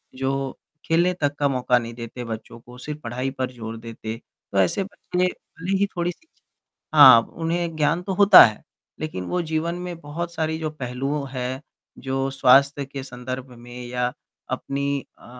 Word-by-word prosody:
जो 135 0 -2 0.3
खेलने 170 +3 +3
तक 145 0 +1
का 145 - +3
मौका 125 -2 +2
नहीं 115 0 -7
देते 120 +1 -7
बच्चों 115 +1 -7
को 125 +1 -14
सिर्फ़ 150 +4 -6
पढ़ाई 125 +3 -2
पर 130 -1 -3
ज़ोर 115 -2 -7
देते। 115 0 -7 0.3
तो 100 - -2
ऐसे 95 - +2
बच्चे 185 -2 -2
भले 180 +1 -4
ही 200 - +3
थोड़ी-सी 175 - -3
शिक्षा - - -44 0.4
हाँ, - - +11
उन्हें 165 0 -3
ज्ञान 155 +3 +1
तो 190 +1 -3
होता 200 +1 +10
है। 110 -2 0 0.4
लेकिन 155 -13 -4
वो 180 - -1
जीवन 160 +1 -1
में 180 -1 -6
बहुत 170 +3 -5
सारी 160 0 -1
जो 155 -1 -3
पहलू 135 +1 -3
हैं 130 +1 -4 0.4
जो 135 0 -1
स्वास्थ्य 135 +2 +4
के 135 0 -7
संदर्भ 130 0 -6
में 120 +1 -9
या 125 0 -1 0.4
अपनी 140 0 -2 0.2
अ, - - -19
135 Hz, 170 wpm, -23 LUFS, 125-165 Hz, 0.4 s, हाँ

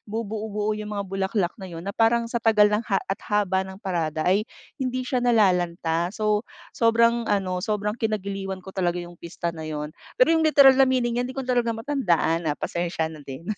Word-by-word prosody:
bubuo-buo 215 -1 -3
yung 210 -1 -5
mga 200 - -2
bulaklak 195 -1 -1
na 190 - -7
yun 170 -1 -8
na 200 - -3
parang 230 +2 +2
sa 235 0 -3
tagal 215 -2 +5
ng 210 - +2
ha 195 - +2
at 195 +2 -3
haba 200 -3 +1
ng 190 - -9
parada 165 -6 -2
ay 200 +5 +2 0.3
hindi 255 0 -2
siya 255 -1 -1
nalalanta." 180 -7 +2
So 215 +1 0 0.2
sobrang 230 0 +3
ano, 185 -3 0
sobrang 210 0 -1
kinagiliiwan 195 -3 -3
ko 190 - -9
talaga 180 -2 0
yung 175 -1 -8
pista 170 0 -4
na 160 -1 -7
yun, 150 0 -5 0.2
pero - - +5
yung 325 - +3
literal 270 -3 +7
na 265 - +6
meaning 245 -2 +1
yan 250 - -2
hindi 260 - -9
ko 270 - -3
talaga 240 -2 0
matandaan 175 - 0
na 150 - -1
pasensya 170 -2 -2
na 155 - -11
din. 140 +3 -9
205 Hz, 200 wpm, -24 LUFS, 175-230 Hz, 0.3 s, literal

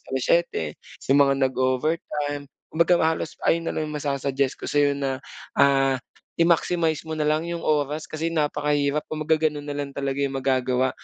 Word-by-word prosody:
7:00, 130 - 0 0.2
sa - - -2
mga 140 0 +5
nag-o-overtime. 145 +2 -1 0.2
Kumbaga 170 +2 +4
halos 160 0 -1
ayun 165 0 +2
na - - 0
lang 155 - -1
'yung 150 - -5
masa-suggest 140 -1 -1
ko - - -16
sa'yo 145 -1 +2
na, 135 -2 -2 0.4
ah, 135 -1 +4 0.3
i-maximize 165 -1 +1
mo 160 - -4
nalang 155 +1 0
'yung 170 0 -4
oras, 150 0 0
kasi 160 +1 -3
napakahirap. 150 -1 0
Kumbaga 155 +1 0
gano'n 150 -2 -1
nalang 145 -1 -4
talaga 140 -1 -2
'yung 140 -1 0
magagawa, 130 -1 +1
145 Hz, 150 wpm, -24 LUFS, 140-155 Hz, 0.4 s, mga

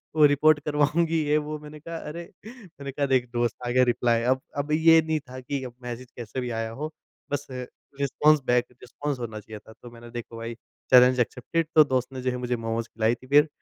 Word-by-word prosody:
वो 155 -1 +7
रिपोर्ट 150 +1 +4
करवाऊँगी 155 +3 +2
ये 150 - +4
वो 155 0 -4
मैंने 150 0 -11
कहा 165 +2 -7
अरे! 170 +2 -7 0.2
मैंने 185 - -10
कहा 140 +1 -1
देख 125 -2 +3
दोस्त 120 -2 0
आ - - -1
गया 125 +1 +4
रिप्लाई 120 -1 +2
अब 130 - -9 0.2
अब 145 +1 -2
ये 160 +1 +6
नहीं 160 0 -1
था 130 -3 -10
कि 130 +1 -4
अब 125 -2 -7
मैसेज 125 +1 -7
कैसे 120 +2 -5
भी 125 - -3
आया 115 - -3
हो। 155 +1 -3 0.4
बस 145 0 -2 0.5
रिस्पॉन्स 150 +2 +3
बैक 125 -1 +3 0.2
रिस्पॉन्स 145 +2 -4
होना 110 -3 -5
चाहिए 105 0 -10
था। 110 - -16
तो 120 - -10
मैंने 120 0 -12
देखो 120 -1 -7
भाई 115 +1 -5 0.4
चैलेंज 125 0 +7
एक्सेप्टेड 140 +7 -1
तो 155 - +9
दोस्त 130 -2 -1
ने 130 - -5
जो 130 0 0
है 125 - -3
मुझे 125 0 0
मोमोस 115 0 -3
खिलाई 115 +1 +1
थी 130 - -17
फ़िर 145 +3 +6
130 Hz, 220 wpm, -26 LUFS, 120-150 Hz, 0.5 s, तो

